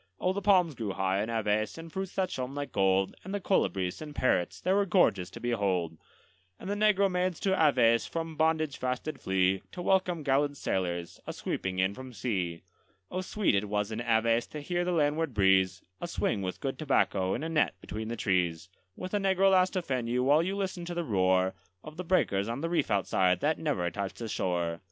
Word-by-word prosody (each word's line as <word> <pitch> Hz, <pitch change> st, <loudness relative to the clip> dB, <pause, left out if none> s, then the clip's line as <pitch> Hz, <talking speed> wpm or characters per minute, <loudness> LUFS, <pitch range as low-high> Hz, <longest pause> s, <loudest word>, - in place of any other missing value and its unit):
Oh, 185 Hz, -, +1 dB
the 200 Hz, -, -3 dB
palms 185 Hz, -5 st, +4 dB
grew 110 Hz, -6 st, -4 dB
high 95 Hz, +1 st, 0 dB
in 110 Hz, -, -3 dB
Aves, 110 Hz, 0 st, 0 dB
and 165 Hz, 0 st, -10 dB
fruits 190 Hz, -1 st, -4 dB
that 190 Hz, -2 st, 0 dB
shone 130 Hz, +1 st, -4 dB
like 145 Hz, 0 st, -4 dB
gold, 95 Hz, 0 st, +2 dB
And 190 Hz, +2 st, -5 dB
the -, -, -1 dB
colibris 95 Hz, -, 0 dB
and 150 Hz, -1 st, -8 dB
parrots 90 Hz, -8 st, +1 dB
they 185 Hz, -, +1 dB
were 200 Hz, +1 st, +3 dB
gorgeous 170 Hz, -, +3 dB
to -, -, -10 dB
behold; 95 Hz, -8 st, -1 dB, 0.6 s
And -, -, -8 dB
the 200 Hz, -, -1 dB
negro 205 Hz, -1 st, +3 dB
maids 180 Hz, -2 st, -1 dB
to 195 Hz, -, +2 dB
Aves 125 Hz, -9 st, +4 dB
from 165 Hz, -1 st, -4 dB
bondage 155 Hz, -2 st, +1 dB
fast 125 Hz, -1 st, -2 dB
did 155 Hz, -3 st, -6 dB
flee, 95 Hz, 0 st, +1 dB
To -, -, -8 dB
welcome 180 Hz, -4 st, +1 dB
gallant 145 Hz, +1 st, +1 dB
sailors, 85 Hz, -5 st, -2 dB
a -, -, -3 dB
sweeping 95 Hz, -1 st, -3 dB
in 95 Hz, +1 st, +2 dB
from 130 Hz, +2 st, -9 dB
sea. 95 Hz, -6 st, -2 dB, 0.5 s
Oh, 185 Hz, -, -2 dB
sweet 205 Hz, +2 st, 0 dB
it 100 Hz, +1 st, 0 dB
was 105 Hz, +1 st, -1 dB
in 110 Hz, +1 st, -3 dB
Aves 115 Hz, 0 st, +2 dB
to 150 Hz, -, -7 dB
hear 175 Hz, +4 st, -1 dB
the 180 Hz, -, -1 dB
landward 155 Hz, -3 st, +1 dB
breeze, 95 Hz, -2 st, +3 dB, 0.2 s
A 175 Hz, -, -3 dB
swing 105 Hz, -10 st, -1 dB
with 95 Hz, -1 st, -4 dB
good 135 Hz, -1 st, -3 dB
tobacco 100 Hz, -10 st, +1 dB
in -, -, -4 dB
a -, -, -2 dB
net 155 Hz, -2 st, +1 dB
between 110 Hz, +1 st, -6 dB
the 115 Hz, -, -3 dB
trees, 90 Hz, -4 st, 0 dB, 0.3 s
With 185 Hz, +1 st, -7 dB
a -, -, +3 dB
negro 195 Hz, 0 st, +3 dB
lass 185 Hz, -1 st, +4 dB
to 185 Hz, -1 st, -2 dB
fan 125 Hz, -6 st, -2 dB
you, 125 Hz, +2 st, +1 dB
while 145 Hz, +4 st, +5 dB
you 190 Hz, +3 st, -2 dB
listened 190 Hz, -3 st, -3 dB
to 175 Hz, -, -4 dB
the 175 Hz, -, -1 dB
roar 95 Hz, -, +2 dB, 0.3 s
Of 155 Hz, +1 st, -10 dB
the 180 Hz, -, -4 dB
breakers 110 Hz, -, +1 dB
on 120 Hz, +4 st, -3 dB
the 165 Hz, +1 st, -2 dB
reef 175 Hz, -, +1 dB
outside, 95 Hz, -2 st, +2 dB
that 155 Hz, +2 st, +1 dB
never 145 Hz, -, -1 dB
touched 100 Hz, +2 st, -4 dB
the 115 Hz, -, -5 dB
shore. 85 Hz, -4 st, -1 dB
130 Hz, 215 wpm, -29 LUFS, -, 0.6 s, while